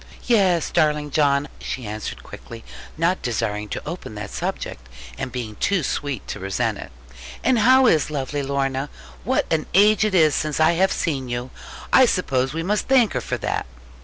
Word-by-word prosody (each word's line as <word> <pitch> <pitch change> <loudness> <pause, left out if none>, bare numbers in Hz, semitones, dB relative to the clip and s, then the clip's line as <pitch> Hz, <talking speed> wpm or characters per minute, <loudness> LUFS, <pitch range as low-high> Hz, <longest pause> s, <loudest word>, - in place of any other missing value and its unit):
'Yes, 190 -8 +2
darling 150 -1 +1
John,' 140 -1 +2
she 130 - -5
answered 105 - -6
quickly, 115 -1 -11 0.3
not 170 +3 +1
desiring 105 -3 -2
to - - -6
open 165 -9 -6
that 105 - -6
subject, 60 -1 -5 0.3
and 125 - -5
being 115 -4 -5
too 195 -5 +1
sweet 140 -4 -3
to - - -5
resent 95 0 -2
it: - - -9 0.5
'and 255 -3 +3
how 260 +4 +6
is 160 - +3
lovely 145 0 -3
Lorna? 135 0 -1 0.3
What 260 +3 +1
an 155 -1 0
age 210 +3 +5
it 215 -3 +1
is 155 -4 +5
since 155 -1 -1
I 160 +1 +5
have 185 +3 +2
seen 135 -6 -2
you! 120 +1 -4 0.4
I 260 -1 +7
suppose 135 - 0
we 165 +1 -3
must 205 +4 -1
thank 255 -5 +4
her - - -1
for - - -3
that.' - - -3
150 Hz, 180 wpm, -22 LUFS, 125-185 Hz, 0.5 s, I